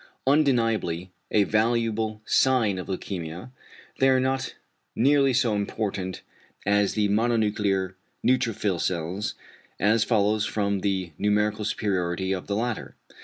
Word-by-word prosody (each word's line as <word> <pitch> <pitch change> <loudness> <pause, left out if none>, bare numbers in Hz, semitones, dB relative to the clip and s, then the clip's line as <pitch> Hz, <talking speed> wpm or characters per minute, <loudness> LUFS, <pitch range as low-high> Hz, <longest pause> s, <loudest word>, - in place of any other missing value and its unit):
Undeniably 115 - +1 0.2
a 105 - +4
valuable 110 0 0
sign 115 -8 +2
of 90 - -6
leukæmia, 90 +2 -5 0.5
they 135 - +5
are 130 -1 +4
not 130 0 -1 0.4
nearly 135 +2 +4
so 125 -3 +2
important 100 -2 -3 0.4
as 100 0 +2
the 105 -1 +2
mononuclear 105 -4 +1 0.3
neutrophil 115 -7 +1
cells, 90 +4 -2 0.4
as 110 +2 +3
follows 105 -2 +2
from 100 -2 0
the 95 -3 -1
numerical 105 +1 +1
superiority 95 -3 -1
of 95 -2 -3
the 100 - -1
latter. 115 +1 -3
105 Hz, 120 wpm, -26 LUFS, 95-115 Hz, 0.5 s, they